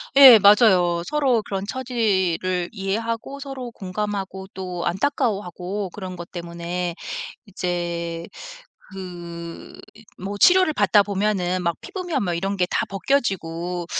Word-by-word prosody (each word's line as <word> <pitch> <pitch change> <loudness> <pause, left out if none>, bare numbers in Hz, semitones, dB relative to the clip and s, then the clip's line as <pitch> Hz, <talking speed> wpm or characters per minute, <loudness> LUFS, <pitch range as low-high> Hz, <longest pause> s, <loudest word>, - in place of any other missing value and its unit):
예 265 -5 +11
맞아요. 190 -5 +5
서로 265 -5 +2
그런 195 -1 -4
처지를 190 -8 0
이해하고 225 +6 -3
서로 270 -3 -6
공감하고 190 -1 -4
또 180 -2 -5
안타까워하고 195 -3 -1
그런 185 -1 -7
것 175 0 -9
때문에 170 0 -4 0.5
이제 170 -3 -3 0.7
그 175 -3 -8 0.2
이 220 - -16
뭐 200 +2 -5
치료를 365 - +6
받다 205 - +4
보면은 195 -3 0
막 170 -1 0
피부며 355 -6 -3
뭐 180 -4 -1
이런 195 +4 -1
게 180 - +2
다 - - 0
벗겨지고 180 -7 -1
190 Hz, 255 characters per minute, -23 LUFS, 175-220 Hz, 0.7 s, 예